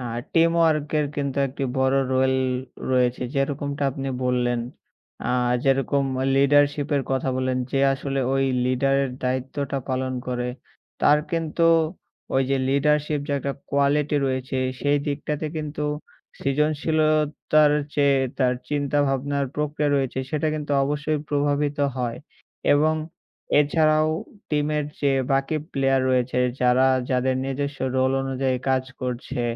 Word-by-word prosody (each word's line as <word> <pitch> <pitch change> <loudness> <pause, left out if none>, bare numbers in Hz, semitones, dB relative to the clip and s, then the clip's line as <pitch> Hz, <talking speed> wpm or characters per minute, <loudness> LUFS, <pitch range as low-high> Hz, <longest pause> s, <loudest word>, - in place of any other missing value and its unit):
আ - - -5 0.3
teamwork 165 -3 +3
এর 150 - +1
কিন্তু 140 -1 -2
একটি 135 +1 -4
বড় 130 +1 +2 0.2
রোল 130 0 +3 0.6
রয়েছে। 125 -1 +2
যেরকমটা 140 +1 -2
আপনি 135 0 -5 0.2
বললেন। 120 -1 +1 0.7
আ - - +1 0.3
যেরকম 135 +1 +2 0.3
লিডারশিপ 145 +1 +3
এর 135 - +1
কথা 130 0 0
বলেন। 130 0 0
যে 135 - 0
আসলে 135 0 -2
ঐ - - +2 0.3
লিডারের 135 +1 +1
দায়িত্বটা 130 +2 -2
পালন 130 0 -1
করে। 125 -1 -2 0.5
তার 150 +1 +6
কিন্তু 165 0 0 0.7
ওই 135 - +4
যে 135 - +3
লিডারশিপ 150 +1 +1
যে - - 0
একটা 140 +1 -3 0.2
কোয়ালিটি 140 +1 +2
রয়েছে 130 0 -2 0.2
সেই 145 0 +2
দিকটাতে 150 +1 -2
কিন্তু 150 -1 -4 0.6
সৃজনশীলতার 150 +1 +2 0.2
চেয়ে 140 -2 +3 0.2
তার 125 -2 +2
চিন্তা-ভাবনার 140 -1 0
প্রক্রিয়া 150 0 0
রয়েছে। 135 -1 -1
সেটা 155 0 0
কিন্তু 150 -1 -3
অবশ্যই 150 +1 -1
প্রভাবিত 145 0 0 0.2
হয় 120 -2 -2 0.6
এবং 155 +2 +3 0.7
এছাড়াও 155 +1 +3 0.4
টিমের 150 0 0 0.2
যে 140 - +2 0.2
বাকি 135 +3 +1 0.2
প্লেয়ার 135 -1 +2
রয়েছে। 125 0 +1 0.2
যারা 125 +1 +4 0.2
যাদের 130 0 +1
নিজস্ব 140 +1 -3 0.2
রোল 130 0 +2
অনুযায়ী 135 -1 -1
কাজ 130 0 +2 0.2
করছে। 125 0 -3
140 Hz, 125 wpm, -24 LUFS, 130-150 Hz, 0.7 s, তার